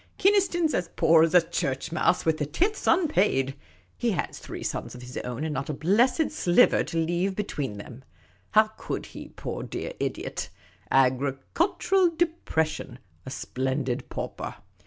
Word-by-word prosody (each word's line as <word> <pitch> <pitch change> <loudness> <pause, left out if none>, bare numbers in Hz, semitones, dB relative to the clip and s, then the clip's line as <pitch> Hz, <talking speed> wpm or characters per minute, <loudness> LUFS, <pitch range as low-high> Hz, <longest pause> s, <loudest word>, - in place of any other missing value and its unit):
Kynaston 385 -3 +3
's 305 - -4
as 175 -2 -1
poor 160 0 +5
as 165 +1 +2
a 170 -2 +6
church 135 +3 -2
mouse 170 +2 +2
with 160 -1 +2
the 150 - 0
tithes 380 - -1
unpaid; 210 - +3 0.4
he 240 - 0
has 170 - -3
three - - -7
sons - - -4
of 125 - -10
his 125 +1 -10
own, 125 +3 -4
and 155 -1 -2
not 135 0 -3
a 150 - -2
blessed 235 - +2
stiver 175 - +4
to 165 - -5
leave 175 +4 0
between 145 - -3
them. 120 +5 -10 0.5
How 215 0 +6
could - - -4
he, - - -9
poor - - -6
dear - - -5
idiot? - - -3 0.4
Agricultural 135 - +2
depression; 160 - -1 0.3
a - - -3
splendid 130 -1 -2
pauper. - - -5
165 Hz, 155 wpm, -27 LUFS, -, 0.5 s, a